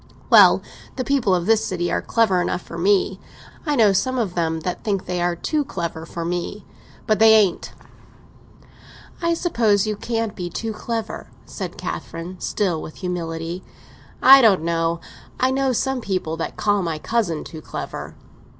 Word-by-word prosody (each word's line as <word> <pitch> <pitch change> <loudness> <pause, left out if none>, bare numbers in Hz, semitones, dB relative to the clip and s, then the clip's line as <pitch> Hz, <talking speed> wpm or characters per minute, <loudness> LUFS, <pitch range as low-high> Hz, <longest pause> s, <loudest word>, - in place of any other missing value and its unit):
"Well, - - +7 0.3
the 255 - -2
people 250 -9 +2
of 175 -1 -1
this 220 +1 +3
city 175 -4 -2
are - - 0
clever 205 -6 +2
enough 175 0 -2
for - - -10
me. 195 +1 +2 0.5
I 295 - +2
know 215 -6 +5
some 255 +7 0
of 215 -7 -1
them 160 -2 -1
that 180 +2 -4
think 200 -4 -1
they 180 -1 -2
are 175 0 +1
too 300 - -1
clever 170 - -5
for 170 -1 -5
me; 175 +4 -4 0.4
but 215 -1 +1
they 220 0 +7
ain't!" 200 -5 +2 1.5
"I 335 0 +1
suppose 225 - +2
you 215 -1 -1
can't 225 0 -3
be 175 -2 -4
too 220 +5 -4
clever," 225 +1 -4 0.2
said - - -6
Catherine, 175 +3 -6
still 175 -6 -1
with 155 - -9
humility. 170 -1 -4 0.6
"I 270 +1 +10
don't 200 -8 +4
know. 165 0 0 0.4
I 255 0 +3
know 270 0 +1
some 265 +1 -1
people 185 -6 -2
that 165 - -5
call 205 -1 +1
my 165 -3 -2
cousin 170 -3 -1
too 160 -2 -9
clever." - - -7
195 Hz, 170 wpm, -22 LUFS, 170-225 Hz, 1.5 s, I